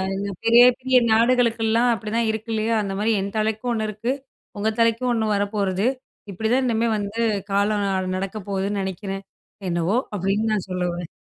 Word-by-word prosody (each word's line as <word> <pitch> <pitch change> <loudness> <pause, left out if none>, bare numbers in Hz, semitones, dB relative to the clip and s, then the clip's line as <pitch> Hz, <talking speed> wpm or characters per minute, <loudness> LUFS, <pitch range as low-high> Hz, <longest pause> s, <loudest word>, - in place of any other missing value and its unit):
இந்த 200 +1 -3
பெரிய, 235 +1 +7 0.2
பெரிய 260 0 +3
நாடுகளுக்கெல்லாம் 230 0 +3
அப்பிடிதான் 225 +1 -1
இருக்கு 220 +1 -5
இல்லயா! 220 +1 0
அந்தமாரி 205 +2 -1
என் 200 +1 -4
தலைக்கும் 220 +3 -1
1 220 -1 -1
இருக்கு. 225 +5 -2 0.5
உங்க 215 +2 +1
தலைக்கும் 230 +2 +2
1 220 -2 0
வரப்போறது. 200 0 0 0.4
இப்பிடிதான் 220 +7 0
இன்னிமே 230 -1 +1
வந்து 205 +2 -3 0.3
காலம் 205 +1 +1
அ - - 0 0.2
நடக்க 195 +2 -4
போகுதுன்னு 200 +1 -1
நினைக்கிறேன். 195 +1 -5 0.5
என்னவோ 170 +4 0 0.2
அப்பிடின்னு 205 +3 0
நான் 205 -3 -2
சொல்ல 180 -1 -2
வரேன். 175 -1 -6
215 Hz, 155 wpm, -23 LUFS, 195-230 Hz, 0.5 s, பெரிய